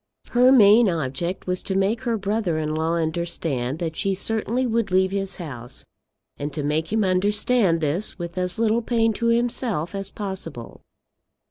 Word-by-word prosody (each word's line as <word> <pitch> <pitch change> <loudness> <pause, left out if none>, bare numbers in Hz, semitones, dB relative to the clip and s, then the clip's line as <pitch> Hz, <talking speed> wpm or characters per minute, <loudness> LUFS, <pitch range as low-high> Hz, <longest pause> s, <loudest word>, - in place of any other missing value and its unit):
Her 250 +2 +5
main 220 -2 +7
object 170 +3 -3
was 180 0 -1
to 190 - -3
make 200 +5 +1
her 235 -3 -1
brother 200 -4 -1
in 155 -1 -2
law 160 +2 0
understand 160 -5 -2
that 165 -1 -3
she 195 +3 0
certainly 225 +5 -1
would 230 -3 0
leave 190 0 +2
his 195 -1 -1
house, 125 -7 -7 0.5
and 145 +1 -4
to 150 - -3
make 155 +3 -1
him 220 0 +2
understand 195 0 +2
this 160 +9 -1
with 170 -1 -6
as 180 -1 -1
little 225 +1 +2
pain 225 -1 +1
to 235 +3 -1
himself 230 -7 0
as 195 0 -3
possible. 190 - -7
190 Hz, 165 wpm, -23 LUFS, 165-220 Hz, 0.5 s, main